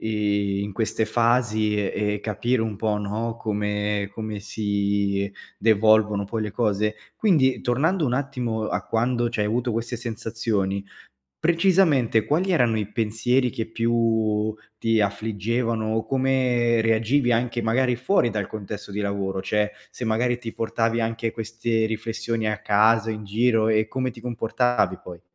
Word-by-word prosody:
i 100 -2 0
in 100 - -5
queste 110 +1 0
fasi 115 -1 +2
e 105 +1 -1
e 105 - -5
capire 115 +3 0
un 110 -3 -3
po', 110 0 0
no, 110 +3 -3
come 105 -1 -1
come 110 -1 -5
si 100 -1 -1 0.3
devolvono 110 -1 +4
poi 110 +2 -3
le 105 - -3
cose. 105 -1 0 0.2
Quindi 150 -12 +3
tornando 155 +8 +1
un 125 - 0
attimo 125 -5 -2
a - - -2
quando 120 +1 0
c'hai 110 -3 -1
avuto 120 +3 0
queste 115 +2 -3
sensazioni, 115 -4 -2 0.5
precisamente 165 - +3
quali 180 +6 +1
erano 120 -10 +3
i 105 -1 -3
pensieri 115 +4 +1
che 115 -1 -4
più 110 -2 +1 0.2
ti 115 -1 +2
affliggevano 110 +2 -1
o 110 - -1
come 130 -3 +2
reagivi 115 +4 +2
anche 120 0 +1
magari 125 +3 +2
fuori 125 -1 +2
dal 105 -2 -2
contesto 105 -1 -7
di 105 - -3
lavoro? 100 -1 -2
Cioè, 105 +1 0 0.2
se 125 - -6
magari 120 +2 +1
ti 115 -2 -7
portavi 115 0 0
anche 115 0 -1
queste 115 0 -1
riflessioni 115 0 -3
a 105 - -1
casa 110 +2 +3
in 110 -1 -5
giro 110 +2 +2
e 110 0 +2
come 130 +2 -2
ti 115 - -13
comportavi 120 -4 0
poi? 85 -2 -10
110 Hz, 150 wpm, -24 LUFS, 105-120 Hz, 0.5 s, devolvono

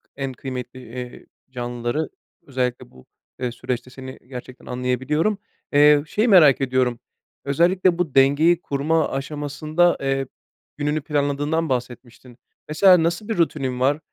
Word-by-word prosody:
en 135 -1 -4
kıymetli, 130 -1 -7
eee, 125 +1 -9 0.3
canlıları, 120 +4 -3 0.4
özellikle 125 -2 -3
bu, 65 - -18 0.3
eee, 125 -1 -2
süreçte 125 +1 -5
seni 130 0 -10
gerçekten 125 -1 -10
anlayabiliyorum. 130 - -1 0.4
Eee, 145 0 +6
şeyi 215 +9 0
merak 155 - +6
ediyorum, 130 -2 0 0.5
özellikle 175 +5 +2
bu 165 -7 -2
dengeyi 150 +6 +4
kurma 155 +3 0
aşamasında, 150 +4 0
eee, 135 -1 -1 0.5
gününü 150 +1 -1
planladığından 145 +2 -1
bahsetmiştin. 125 -1 -5 0.3
Mesela 180 +2 +5
nasıl 175 +5 -1
bir 225 - -2
rutinin 135 -6 0
var? 140 +4 +2
140 Hz, 125 wpm, -22 LUFS, 125-155 Hz, 0.5 s, Eee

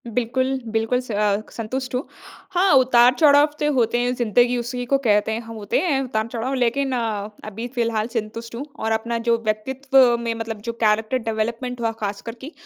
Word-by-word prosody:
बिल्कुल, 255 +3 -1
बिल्कुल 225 +2 0
स 250 - -9
अ, 205 0 +1
संतुष्ट 250 +3 -4
हूँ। 250 - -1 0.5
हाँ, 370 +1 +3
उतार-चढ़ाव 260 +3 +6
तो 295 0 +1
होते 240 -2 +2
हैं 245 +1 +1
ज़िन्दगी 245 +1 +2
उसी 245 +1 -4
को - - +6
कहते 220 -5 +2
हैं, 220 +1 -2
ह 230 - -7
होते 205 - 0
हैं 310 -7 +1
उतार 220 -4 -2
चढ़ाव 235 +3 -3
लेकिन 265 +2 0
अ, 215 -4 -2 0.2
अभी 220 +3 -5
फिलहाल 230 -2 0
संतुष्ट 230 +1 -5
हूँ। 265 +5 -5
और 220 - -1
अपना 230 +1 -1
जो 230 - +4
व्यक्तित्व 260 +3 +3
में 230 -1 -1
मतलब 225 -2 -5
जो - - -2
कैरेक्टर 220 +3 +2
डेवलपमेंट 235 +3 -3
हुआ 225 -1 +1
खासकर 205 +3 -4
की, 280 +4 -8
235 Hz, 185 wpm, -22 LUFS, 220-255 Hz, 0.5 s, उतार-चढ़ाव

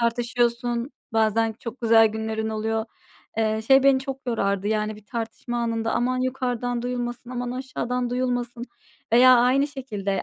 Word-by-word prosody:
tartışıyorsun. 240 +1 0 0.2
Bazen 225 0 +2
çok 235 +2 -7
güzel 225 -1 +6
günlerin 220 0 -3
oluyor. 220 0 -1 0.5
Eee, 220 0 +1
şey 270 +1 +6
beni 275 -1 +5
çok 270 -1 -6
yorardı 200 -4 0
yani 215 0 -1
bir 210 - -16
tartışma 235 +1 -4
anında, 230 -1 -1
aman 255 +1 0
yukarıdan 245 -2 -2
duyulmasın, 245 0 -4
aman 245 -1 -3
aşağıdan 250 -1 -3
duyulmasın 245 -1 -2 0.5
veya 255 +1 +8
aynı 255 +4 +3
şekilde 215 -9 -3
240 Hz, 140 wpm, -24 LUFS, 225-250 Hz, 0.5 s, veya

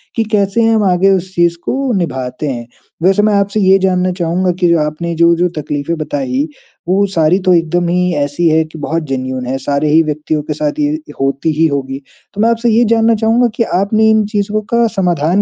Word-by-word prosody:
कि 225 - +1
कैसे 205 +1 +1
हम 225 -2 +2
आगे 190 0 +3
उस 185 0 -3
चीज़ 170 0 +2
को 270 0 -1
निभाते 130 -4 -3
हैं। 120 -3 -5 0.4
वैसे 195 +3 +3
मैं 215 0 +2
आपसे 200 +1 0
ये 190 -1 +4
जानना 185 -1 +1
चाहूँगा 180 +1 -1
कि 180 - +3
जो 170 -1 +3
आपने 155 +3 -3
जो 170 +1 +4
जो 175 +1 +1
तकलीफें 145 +3 -3
बताई, 140 -2 -2 0.4
वो 195 +3 +2
सारी 165 +3 +3
तो 185 - +4
एकदम 170 +1 +1
ही 180 +1 +1
ऐसी 145 +4 0
है 160 0 +3
कि 155 +1 -12
बहुत 165 +3 -2
जेनुइन 130 -1 -3
है, 130 +2 -2
सारे 140 +3 -1
ही 160 +2 +5
व्यक्तियों 155 0 -2
के - - -4
साथ 300 0 -3
ये 305 +2 -2
होती 135 +3 0
ही 165 - +3
होगी। 135 -2 -4 0.3
तो 205 - -3
मैं 225 - +3
आपसे 235 +1 +1
ये 230 +2 +3
जानना 225 0 +3
चाहूँगा 225 +3 +2
कि 230 - +1 0.2
आपने 215 +3 +2
इन 220 -1 +3
चीज़ों 210 0 -1
का 235 0 +3
समाधान 175 0 +1
175 Hz, 210 wpm, -14 LUFS, 150-210 Hz, 0.4 s, ही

